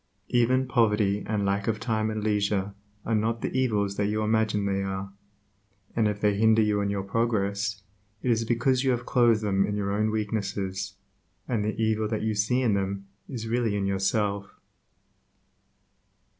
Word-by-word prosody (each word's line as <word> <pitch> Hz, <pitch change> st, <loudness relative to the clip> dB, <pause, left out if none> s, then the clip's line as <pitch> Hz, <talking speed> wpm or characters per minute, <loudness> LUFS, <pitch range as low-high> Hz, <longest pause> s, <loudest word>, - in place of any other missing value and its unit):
Even 125 Hz, +2 st, +3 dB
poverty 105 Hz, -5 st, +2 dB
and 105 Hz, -2 st, 0 dB
lack 100 Hz, 0 st, 0 dB
of 110 Hz, -1 st, 0 dB
time 110 Hz, -2 st, 0 dB
and 110 Hz, -1 st, -3 dB
leisure 100 Hz, -2 st, 0 dB, 0.3 s
are 115 Hz, -, -1 dB
not 115 Hz, +2 st, 0 dB
the -, -, -3 dB
evils 105 Hz, -6 st, +1 dB
that 100 Hz, -, +1 dB
you 110 Hz, +1 st, 0 dB
imagine 110 Hz, -1 st, +1 dB
they 100 Hz, 0 st, 0 dB
are, 95 Hz, 0 st, -4 dB, 0.8 s
and 115 Hz, -2 st, +3 dB
if 105 Hz, -1 st, -2 dB
they 105 Hz, -1 st, +2 dB
hinder 110 Hz, +1 st, +4 dB
you 105 Hz, -1 st, +1 dB
in 100 Hz, -, 0 dB
your 100 Hz, -1 st, -2 dB
progress, 105 Hz, -1 st, -1 dB, 0.4 s
it 125 Hz, -, +2 dB
is 115 Hz, 0 st, +2 dB
because 125 Hz, +3 st, +1 dB
you 135 Hz, -, +2 dB
have 125 Hz, -1 st, 0 dB
clothed 120 Hz, -3 st, +3 dB
them 100 Hz, -2 st, +2 dB
in 105 Hz, -, -1 dB
your 100 Hz, -1 st, -1 dB
own 105 Hz, +2 st, +1 dB
weaknesses, 100 Hz, -2 st, -2 dB, 0.5 s
and 115 Hz, -4 st, 0 dB
the 110 Hz, +1 st, -2 dB
evil 110 Hz, -1 st, +1 dB
that 110 Hz, 0 st, -2 dB
you 110 Hz, 0 st, 0 dB
see 110 Hz, +5 st, +1 dB
in 115 Hz, -4 st, +3 dB
them 100 Hz, 0 st, -2 dB, 0.2 s
is 115 Hz, -4 st, -5 dB
really 115 Hz, -2 st, 0 dB
in 100 Hz, -1 st, -1 dB
yourself. 100 Hz, +1 st, -1 dB
105 Hz, 175 wpm, -27 LUFS, 100-115 Hz, 0.8 s, hinder